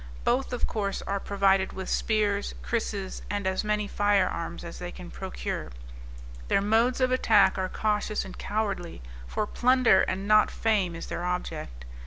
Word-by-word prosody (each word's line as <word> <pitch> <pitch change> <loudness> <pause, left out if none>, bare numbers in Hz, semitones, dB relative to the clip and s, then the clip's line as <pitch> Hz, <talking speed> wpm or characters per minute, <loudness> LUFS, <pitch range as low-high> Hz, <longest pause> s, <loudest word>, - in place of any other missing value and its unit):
Both, 260 +2 +1
of 245 - -1
course, 200 -3 -2
are 200 0 -2
provided 195 -1 +2
with 190 -1 -6
spears, 205 -2 0
krisses, 205 -4 -3
and 205 -1 -2
as 190 +1 0
many 210 -1 0
fire 205 -2 +2
arms 170 +1 -5
as 170 - -8
they 175 0 -5
can 180 -1 -10
procure. 190 - -5 0.8
Their - - +3
modes 225 +6 +2
of 255 -1 +2
attack 220 -5 +4
are 185 0 -1
cautious 210 0 -1
and 190 - -9
cowardly, 200 - -3 0.2
for 210 - -1
plunder 245 -4 +4
and 190 +2 -2
not 215 0 +5
fame 200 -6 0
is 165 - -6
their 175 - -4
object. 120 - -4
200 Hz, 165 wpm, -27 LUFS, 185-215 Hz, 0.8 s, not